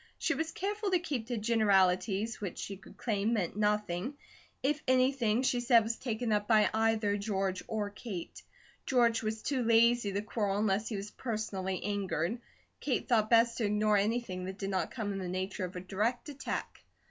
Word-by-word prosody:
She 330 - +1
was 320 +3 -2
careful 410 +2 -2
to 370 - +4
keep 285 -10 -3
to 240 -1 -2
generalities 210 -1 +2
which 195 -4 -4
she 200 - -5
could 190 - -16
claim 215 -1 0
meant 195 -6 -1
nothing, 210 +2 0 0.5
if 295 +3 +1
anything 255 -3 +3
she 255 -2 +2
said 240 -1 +5
was 225 +2 -2
taken 230 -2 -2
up 210 0 +1
by 215 -2 +4
either 220 -2 +2
George 195 -2 -1
or 210 -2 -2
Kate. 200 -4 -7 0.5
George 235 -3 +3
was 220 0 -3
too 270 -2 0
lazy 235 -1 +4
to 200 +1 -1
quarrel 205 -2 -1
unless 210 +1 +1
he 220 - -3
was 200 +1 -5
personally 205 -5 -3
angered; 200 0 -1 0.4
Kate - - -1
thought 220 -4 +3
best 230 0 +4
to 225 - +1
ignore 210 +1 +2
anything 200 -3 -1
that 190 +1 -6
did 195 -1 -3
not 190 - 0
come 210 -4 -3
in 195 - -4
the 185 - -4
nature 185 +1 -3
of 180 +2 -9
a - - -3
direct 215 - -1
attack. 280 -1 -5
215 Hz, 185 wpm, -31 LUFS, 200-235 Hz, 0.5 s, said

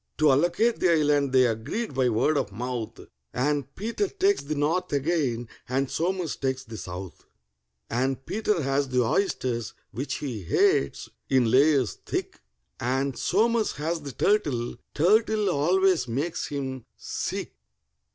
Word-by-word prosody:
To 155 -2 +5
allocate 175 - +2
the 185 - +3
island 145 -3 +2
they 130 -1 +5
agreed 130 - -2
by 130 -1 +2
word 120 +7 +2
of 105 -8 -1
mouth, 120 +1 -4 0.3
And 140 0 -1
PETER 230 - -1
takes 395 +1 +1
the 155 +2 -4
north 165 +6 0
again, 140 -5 0 0.2
and 135 +1 0
SOMERS 175 -2 -1
takes 130 -1 -2
the 115 -3 -9
south; 90 0 -8 0.6
And 130 +2 -1
PETER 210 -5 0
has 135 0 0
the 125 -1 +2
oysters, 120 - -1 0.2
which 135 +4 -3
he 125 -8 -4
hates, 395 - +2 0.2
in 125 -4 +3
layers 135 -2 +3
thick, - - -4 0.4
And 130 +2 0
SOMERS 230 - +1
has 160 +2 -2
the 140 -2 -7
turtle—turtle 200 - +1
always 175 -1 +2
makes 145 +9 -2
him 130 -4 -4
sick. - - -4
140 Hz, 135 wpm, -26 LUFS, 125-175 Hz, 0.6 s, To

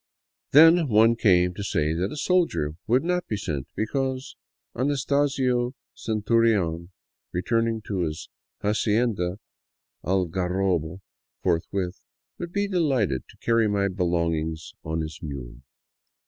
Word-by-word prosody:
Then 165 +4 +8
some 165 -5 -1
one 115 +1 +5
came 90 -5 +3
to 100 - -6
say 75 -5 0
that 90 +4 -1
a - - -6
soldier 165 - +1
would 125 +5 +3
not 180 +1 -1
be 105 - -2
sent, 75 -8 -4
because 130 +4 -2 0.4
Anastasio 135 -2 +1 0.2
Centurion, 105 -6 +1 0.4
return 115 +6 +1
ing 115 -1 -2
to 100 -3 -3
his 80 -3 -3 0.2
" - - -56
Hacienda 105 -3 +1 0.7
Algarrobo 90 -1 0 0.2
" - - -52
forthwith, 90 +2 -1 0.4
would 175 -1 -5
be 200 +2 0
delighted 135 - 0
to - - -17
carry 115 -1 +3
my 100 -1 +1
belongings 85 -3 -1
on 80 +1 -2
his 80 0 -6
mule. 65 -6 -7
100 Hz, 130 wpm, -25 LUFS, 85-125 Hz, 0.7 s, Then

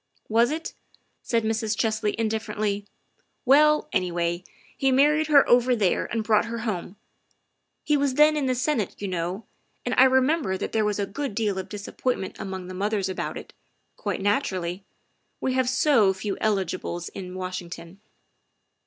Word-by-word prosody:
" - - -45
Was 235 +1 +5
it?" 320 +2 -4 0.5
said 230 -1 0
Mrs. 220 -1 -1
Chesley 220 -2 0
indifferently. 215 -2 -2 0.3
" - - -45
Well, 300 +3 +5
anyway, 175 -1 0 0.3
he 270 -1 +1
married 300 +4 +4
her 290 -2 +6
over 245 +1 +4
there 200 -6 +1
and 225 -1 -2
brought 215 -1 +3
her 230 +1 -4
home. 190 -3 -3 0.9
He 300 - +2
was 280 -2 +1
then 300 +1 +5
in 290 -3 0
the 255 - +1
Senate, 250 -6 -1
you 200 - -4
know, 180 +3 -3 0.4
and 245 - -1
I 260 - +9
remember 260 - +2
that - - -4
there 220 -1 +1
was 210 -1 0
a 200 - 0
good 270 +2 -5
deal 205 -3 0
of 190 - -6
disappointment 205 0 -3
among 190 -1 -5
the 185 - -8
mothers 200 +1 -1
about 190 - -4
it, - - -10 0.4
quite - - -3
naturally, 190 -4 -1 0.6
we 260 - -1
have 260 -1 +1
so 255 -6 +4
few 195 +1 -3
eligibles 185 -4 -1
in 185 -1 -8
Washington." 185 -1 -6
215 Hz, 165 wpm, -25 LUFS, 190-260 Hz, 0.9 s, I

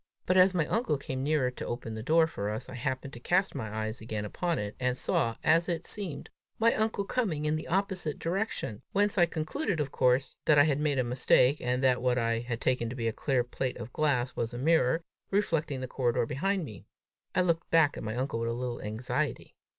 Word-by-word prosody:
But 185 - +2
as 185 0 +6
my 165 -3 +2
uncle 220 - 0
came 130 -1 -4
nearer 140 -3 +1
to - - -7
open 120 -2 -4
the 110 - -5
door 160 +7 +4
for 105 -10 -4
us, 110 +4 -4
I - - -8
happened 130 +2 -3
to 120 - -8
cast 185 +9 +1
my 110 -7 -4
eyes 110 +1 -4
again 110 -2 -4
upon 170 - -1
it, 105 0 -4
and 125 0 0
saw, 115 -2 0
as 165 +3 +3
it 170 -1 -2
seemed, 190 -9 -5 0.3
my 230 +1 +4
uncle 215 -2 0
coming 185 -12 -1
in 150 +1 +2
the 155 - -4
opposite 185 -4 -1
direction; 170 - -2
whence 205 0 +2
I 175 - +6
concluded 170 - -2
of 145 -2 -1
course, 125 +2 +2
that 150 - +5
I 145 - +8
had 145 -2 +1
made 150 -2 +1
a 130 - +3
mistake, 125 +2 +3
and 125 +1 0
that 125 -2 +3
what 125 0 +2
I 115 -1 +1
had 120 -1 -4
taken 125 -3 0
for 125 +2 -7
a 115 -1 0
clear 130 +2 0
plate 125 +1 -3
of 120 +1 -8
glass, 130 -5 +1
was 115 +1 -2
a - - -4
mirror, 160 +2 +2 0.3
reflecting 165 -9 0
the 130 - -3
corridor 120 -2 0
behind 190 - -1
me. 105 -9 -11 0.5
I 185 - +4
looked 170 -2 0
back 160 -3 +4
at - - -6
my 110 0 -4
uncle 125 -2 -2
with 115 0 -1
a - - -1
little 120 0 -4
anxiety. 110 +4 -3
135 Hz, 225 wpm, -29 LUFS, 120-165 Hz, 0.5 s, I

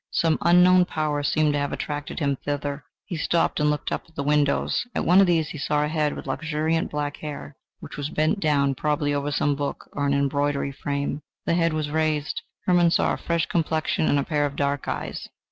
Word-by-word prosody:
Some 165 -1 +1
unknown 180 +1 +6
power 155 -3 -1
seemed 150 +1 +2
to 145 - 0
have 145 0 -2
attracted 145 -1 -4
him 140 -3 +1
thither. 145 0 -3 0.2
He 175 - -5
stopped 165 +1 +1
and 150 0 +3
looked 150 0 -2
up - - -3
at 165 - -26
the 140 - -2
windows. 145 0 +1
At - - -1
one 180 +3 +6
of 195 - +4
these 165 -3 +2
he 160 -5 -7
saw 150 +1 +1
a - - -3
head 150 -2 0
with - - -8
luxuriant 160 +3 -1
black 145 -1 -3
hair, 145 -1 -7 0.3
which - - -9
was 145 0 -3
bent 155 +7 +1
down 140 -5 +2
probably 145 +1 0
over 145 0 -1
some 145 0 +1
book 145 0 -4
or 145 0 -1
an 140 - +2
embroidery 140 0 0
frame. 140 +1 -3 0.2
The - - +1
head 165 -1 +2
was 155 -1 -2
raised. 155 -1 0 0.2
Hermann 175 -2 +4
saw - - +2
a - - -3
fresh 170 -1 0
complexion 160 -1 0
and 145 - +3
a 140 - +1
pair 145 -1 0
of 140 - -8
dark 140 -1 -1
eyes. - - -4
150 Hz, 215 wpm, -24 LUFS, 145-160 Hz, 0.3 s, unknown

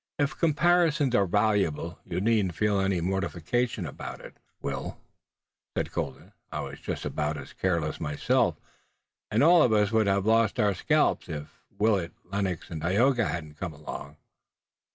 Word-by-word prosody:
"If 145 0 0
comparisons 165 -3 +3
are 100 -4 +3
valuable 95 -5 +1
you 85 - -3
needn't 100 -4 +1
feel 105 +2 +2
any 95 -2 +1
mortification 95 +4 -1
about 75 - -7
it, - - -12 0.2
Will," 70 -1 -4 0.8
said - - -1
Colden. - - -5 0.2
"I - - -3
was - - -7
just - - -4
about 75 0 -2
as 70 - -9
careless 85 -5 -1
myself, 75 -2 +1 0.7
and - - +2
all 170 +1 +7
of 125 - +4
us 105 -1 +3
would 110 -2 +3
have 100 0 +2
lost 115 +1 +3
our 105 -2 +3
scalps, - - +1
if 75 -1 -7 0.2
Willet, 100 -5 +1
Lennox 95 -2 -3
and 80 -2 -5
Tayoga 120 - +3
hadn't 75 -4 -5
come 90 -4 -4
along." 75 0 -8
100 Hz, 155 wpm, -28 LUFS, 85-115 Hz, 0.8 s, all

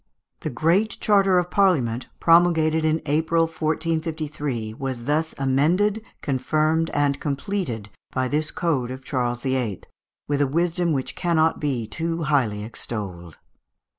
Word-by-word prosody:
The - - -3
great 170 - +1
charter 195 -3 +4
of 180 - +3
the - - -21
Parliament, 135 - +2
promulgated 165 -2 +4
in 155 +1 +1
April, 160 +3 +2
1453, 155 -7 -2
was 130 0 -4
thus 155 +4 0
amended, 165 +11 +2 0.2
confirmed, 155 +4 +1
and 145 -1 +1
completed, 140 - -3 0.2
by 130 0 0
this 150 +3 0
code 145 -8 -1
of 130 +1 -8
Charles 120 -3 -1
VIII., 130 -7 -1 0.4
with 145 0 0
a 145 - +3
wisdom 170 +3 +1
which 135 -3 -2
cannot 165 -2 +2
be 135 -6 -1
too 165 +7 -3
highly 125 -9 +1
extolled. 95 -7 -6
150 Hz, 135 wpm, -23 LUFS, 130-165 Hz, 0.4 s, charter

